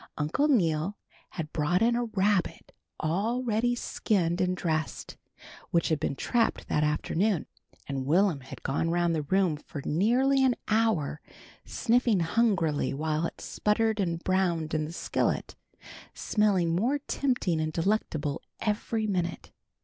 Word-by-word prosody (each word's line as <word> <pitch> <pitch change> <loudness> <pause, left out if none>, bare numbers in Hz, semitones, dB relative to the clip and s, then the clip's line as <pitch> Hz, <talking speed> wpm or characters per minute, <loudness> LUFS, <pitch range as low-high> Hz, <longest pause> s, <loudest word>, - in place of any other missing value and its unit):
Uncle 155 - +1
Neal 180 - +1 0.3
had 160 -4 -6
brought 170 +6 +1
in 235 +1 +3
a 240 0 0
rabbit 205 -3 0 0.3
all 205 +11 0
ready 240 +1 +1
skinned 185 -7 0
and 185 0 0
dressed, 155 -4 -2 0.5
which 170 - +1
he 160 - +3
had 140 - -2
trapped 235 -2 0
that 150 - +1
afternoon, 165 +5 0 0.4
and 135 -1 -3
Will'm 175 0 +3
had 130 - -11
gone 145 +5 0
around 175 0 +1
the 160 - 0
room 175 +1 +1
for 150 - -8
nearly 250 - +3
an 255 -2 +3
hour, 215 -10 +1 0.4
sniffing 235 -5 +2
hungrily 165 - +1
while 155 +2 0
it - - -11
sputtered 220 +1 0
and 170 -3 -1
browned 175 -5 0
in 155 -1 0
the 155 - -7
skillet, 170 - -1 0.6
smelling 190 -6 +1
more 240 +10 +1
tempting 250 - -1
and 155 0 -1
delectable 165 -5 -1 0.2
every 220 +1 -1
minute. 180 -4 -2
180 Hz, 140 wpm, -28 LUFS, 155-220 Hz, 0.6 s, in